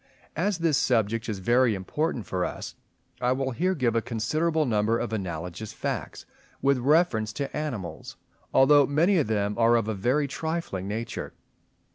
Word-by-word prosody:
As 190 +4 0
this 165 -5 +2
subject 115 -1 +1
is 105 - -2
very 120 +4 +3
important 120 - -2
for 90 +1 -2
us, - - -5 0.5
I 125 0 +2
will 135 0 -2
here 180 +9 0
give 125 -6 0
a 115 - +3
considerable 155 +9 0
number 110 -1 +1
of 110 - -3
analogous 90 0 -5
facts, - - -4 0.3
with 140 -1 +2
reference 130 -6 +2
to 140 -1 -4
animals; 110 - -5 0.3
although 145 +1 +6
many 170 +6 +3
of 150 - 0
them 105 -1 0
are 115 +1 +5
of 115 -2 +1
a 110 - -1
very 125 +9 +1
trifling 160 - -3
nature. 110 +3 -4
120 Hz, 160 wpm, -26 LUFS, 105-150 Hz, 0.5 s, although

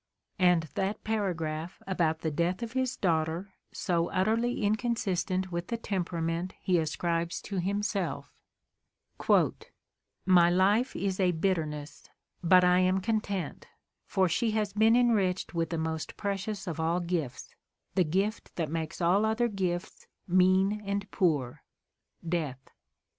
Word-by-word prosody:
And 180 -3 +4
that 195 +2 -2
paragraph 170 -6 -2
about 165 -4 0
the 160 - -1
death 175 +8 0
of 230 - -5
his 260 0 -1
daughter, 170 +2 0 0.2
so 170 -2 0
utterly 220 +5 +1
inconsistent 205 -4 0
with 170 0 -3
the 235 - -2
temperament 175 -4 -2
he 180 -2 +2
ascribes 170 +2 -1
to 200 - -5
himself: 200 0 -2 1.9
"My 175 -2 +6
life 200 +8 +2
is 195 -1 -2
a 180 -2 +3
bitterness, 160 -4 -2 0.3
but 180 +1 +6
I 180 0 +5
am 185 +1 +3
content; 205 -3 -2 0.4
for 190 -2 +2
she 225 +7 +1
has 210 -2 -1
been 220 +2 +5
enriched 210 -8 +2
with 165 -1 -1
the 165 - -2
most 160 0 -3
precious 200 0 -3
of 165 -4 -4
all 165 +2 +1
gifts 170 -7 -3 0.2
— - - -52
the 185 - +3
gift 195 +7 -2
that 160 -4 -2
makes 160 +1 -4
all 180 +5 +3
other 220 +2 +2
gifts 185 -3 -3 0.2
mean 185 +3 +3
and 200 0 -3
poor 150 -10 0 0.3
— - - -42
death. 150 -6 -3
185 Hz, 135 wpm, -29 LUFS, 170-205 Hz, 1.9 s, My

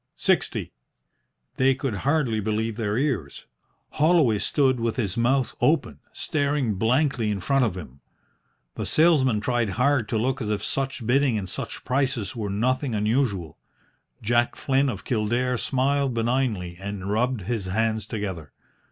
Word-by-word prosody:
"Sixty." - - 0 0.8
They 130 0 +4
could 130 -2 -3
hardly 135 -5 +1
believe 110 +1 -1
their 105 -1 -1
ears. 125 - -2 0.5
Holloway 150 -9 +3
stood 130 -1 +2
with 115 -1 -1
his 100 -7 -1
mouth 125 +3 +1
open, 150 -1 +1
staring 140 -6 -1
blankly 115 +3 +1
in 105 -2 -1
front 135 +7 +2
of 95 -5 -2
him. 70 -6 -10 0.7
The - - -4
salesman 140 -9 +3
tried 120 -1 0
hard 130 -4 +2
to 110 - 0
look 130 +4 -1
as 105 - -3
if 105 -1 -1
such 135 -3 -2
bidding 130 0 +2
and 95 -2 -4
such - - -6
prices 130 -3 -1
were 105 -3 -3
nothing 125 +5 0
unusual. 105 - 0 0.6
Jack 120 +2 +2
Flynn 135 0 +1
of 100 -6 -6
Kildare 120 +2 0
smiled 135 0 0
benignly 115 -7 -1
and 100 -1 -5
rubbed 120 +2 0
his 105 +1 -3
hands 110 +3 -1
together. 95 - -5
120 Hz, 145 wpm, -25 LUFS, 105-135 Hz, 0.8 s, They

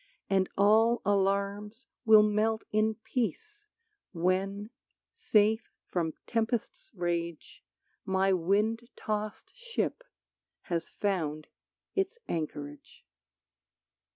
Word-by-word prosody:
And 190 -1 +3
all 220 +4 +5
alarms 200 +3 0 0.2
Will 215 -1 +8
melt 215 +1 +1
in 215 +1 +2
peace 415 - -3 0.5
when, 195 +4 0 0.4
safe 220 - +2 0.2
from 165 -3 -2
tempest's 230 0 -2
rage 170 -2 -3 0.4
My 190 0 +2
wind 210 +7 +1
tossed 215 0 -4
ship 485 0 -3 0.6
has 170 -2 -3
found 155 -7 -2 0.5
its 390 +4 -1
anchorage. 145 -3 -5
205 Hz, 85 wpm, -30 LUFS, 185-225 Hz, 0.6 s, Will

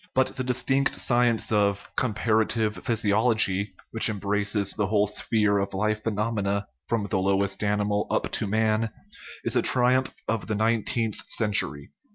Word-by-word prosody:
But 130 0 +1
the 130 - -3
distinct 130 +2 +1
science 120 -2 +2
of 100 -1 0
"compar 110 -2 +1
ative 110 -1 -2
physiology," 110 -3 +2 0.2
which 115 0 +4
embraces 100 -1 0
the 105 -2 -1
whole 105 0 +2
sphere 105 0 +1
of 100 0 -3
life 105 +2 -1
phenomena, 105 -2 -2 0.2
from 115 -3 0
the 100 -1 -1
lowest 100 +1 0
animal 105 0 0
up - - -1
to - - -2
man, 110 +1 +1 0.5
is - - -2
a - - +3
triumph 130 +1 +2 0.2
of 110 -1 -2
the 110 - -1
nineteenth 110 0 0
century. 95 - 0
110 Hz, 150 wpm, -25 LUFS, 100-115 Hz, 0.5 s, which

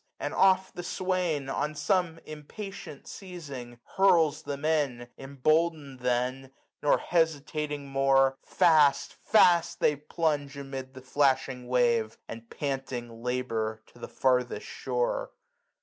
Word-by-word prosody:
Aiid - - -3
oft 190 0 +3
the 175 - -4
swsdn. 175 -7 -1
On 150 +1 -2
some 165 +2 0
impatient 155 +1 -9
seizing, 140 -11 -9 0.2
hurls 165 -6 +4
them 145 -1 -5
in: 145 -6 0
380 - - -11
Emboldened 145 0 0
then, 125 +2 -1 0.3
nor 145 - +4
hesitating 150 -3 -1
more. 135 -1 +3
Fast, 150 -5 +3
fast, 175 -6 +3
they 150 - +3
plunge 145 -1 -2
amid 135 -1 -7
the 130 - -10
flashing 130 -2 +1
wave. 120 -3 +1
And 115 0 -9
panting 125 -5 -4
labour 115 -3 -2
to 120 - -17
the - - -7
farthest 125 -2 0
shore. - - -2
140 Hz, 120 wpm, -28 LUFS, 130-160 Hz, 0.3 s, hurls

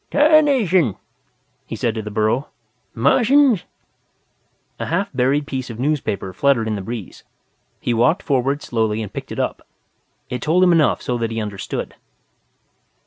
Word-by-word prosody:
"Tarnation!" 270 - +4 0.7
he - - -5
said 115 - -1
to 110 - -4
the 105 - -6
burro. 110 +6 0 0.5
"Martians?" 235 - +4 1.1
A - - -3
half 185 +5 -1
buried 135 +3 +1
piece 130 -3 -4
of 115 - -7
newspaper 130 -9 -2
fluttered 125 0 +2
in 110 - -1
the 100 - -3
breeze. 110 -1 -7 0.6
He 120 - -1
walked 125 - +2
forward 140 0 0
slowly 110 -2 -1
and 105 - -8
picked - - -7
it - - -5
up. - - -2 0.6
It 125 -1 -5
told 170 +7 +3
him 180 - +5
enough 165 -3 +3
so 125 -1 -2
that 115 -1 -1
he 115 0 -3
understood. 105 -3 -5
130 Hz, 150 wpm, -20 LUFS, 110-170 Hz, 1.1 s, him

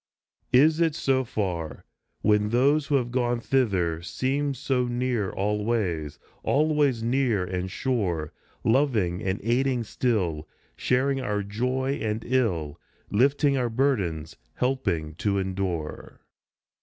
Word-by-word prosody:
Is 155 +5 +5
it 165 -3 +2
so 130 -3 +1
far? 85 - -3 0.4
When 105 0 +3
those 140 +5 +3
who 145 - +2
have 120 -3 0
gone 120 -1 +1
thither 95 -11 +1
Seem 135 +9 -1
so 125 0 0
near 120 -4 -1
always, 105 -7 -1 0.2
always 145 -5 +2
near 120 -5 +1
and 90 0 -3
sure, 95 - -1 0.3
Loving 110 -8 +2
and 95 +1 -1
aiding 125 +2 +1
still, 90 - -1 0.3
sharing 135 +2 +1
our 105 -4 -1
joy 125 +6 -1
and 110 0 -2
ill, 95 - 0 0.3
Lifting 140 +5 +3
our 125 -2 0
burdens, 100 - -1 0.2
helping 105 -12 -1
to 100 0 0
endure. 95 -5 -3
115 Hz, 120 wpm, -26 LUFS, 95-130 Hz, 0.4 s, Is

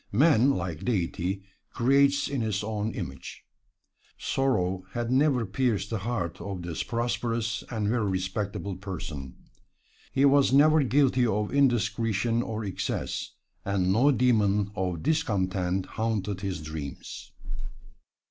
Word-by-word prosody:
Man, 135 +1 +5
like 85 - -2
Deity, 95 -3 -1 0.3
creates 140 +3 +3
in 140 -3 -2
his 105 -3 -1
own 110 0 -2
image. - - -7 0.7
Sorrow 95 -9 0
had 120 0 -2
never 130 -3 +3
pierced 105 -1 -1
the 110 - -1
heart 95 -5 -3
of 95 -3 -5
this 85 -2 -3
prosperous 115 -2 -1
and 110 -3 -1
very 110 -2 +1
respectable 95 +1 -3
person. 80 -9 -6 0.8
He 135 - +3
was 140 -1 +5
never 155 +3 +6
guilty 130 -2 +3
of 105 +1 -1
indiscretion 115 -3 +2
or 110 -2 -4
excess, 95 - -3 0.3
and 95 -1 +1
no 125 +8 +4
demon 105 -6 +2
of 90 -5 -2
discontent 95 - 0
haunted 105 -3 -2
his 95 -6 -3
dreams. 75 -2 -7
105 Hz, 120 wpm, -27 LUFS, 95-125 Hz, 0.8 s, never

